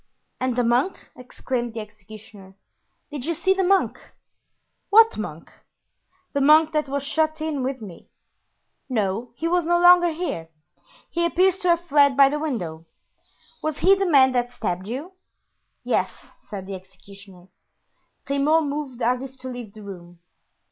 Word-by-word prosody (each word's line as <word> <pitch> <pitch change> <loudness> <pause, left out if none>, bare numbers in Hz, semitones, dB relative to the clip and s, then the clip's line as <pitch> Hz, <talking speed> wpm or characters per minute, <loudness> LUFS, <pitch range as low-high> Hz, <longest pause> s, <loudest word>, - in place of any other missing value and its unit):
"And 255 -2 -1
the 245 - +1
monk?" 245 +10 +1 0.2
exclaimed 245 -1 -5
the - - -3
executioner, 210 -2 -13 0.6
"did 290 -4 -6
you 335 +4 -2
see 380 +4 +2
the 385 0 0
monk?" 385 +1 +2 0.9
"What 450 +2 +6
monk?" - - -7 0.8
"The 280 - 0
monk 305 +3 +5
that 305 -2 -1
was 280 0 -2
shut 315 +2 0
in 310 -3 -2
with 255 -2 -3
me." 185 -5 -12 0.8
"No, 220 0 -1
he 330 - -3
was 350 +1 +1
no 345 +2 +2
longer 350 0 +7
here; 310 - -4 0.6
he 340 - -1
appears 365 +2 +2
to 360 - -2
have 340 -1 +3
fled 285 -5 +3
by 275 -1 +7
the 300 +1 -2
window. 175 - -4 0.7
Was 310 -1 -3
he 385 - +5
the 390 -1 +1
man 265 -4 +6
that 245 -1 0
stabbed 190 -6 -4
you?" 275 - -5 0.7
"Yes," - - 0 0.3
said 195 -2 -8
the 195 - -7
executioner. 190 0 -13 0.8
Grimaud 290 +4 +2
moved 280 -4 -4
as 250 +2 +1
if 265 0 -9
to 260 0 -6
leave 245 -4 -8
the 215 - -12
room. 175 -3 -11
265 Hz, 155 wpm, -23 LUFS, 215-315 Hz, 0.9 s, longer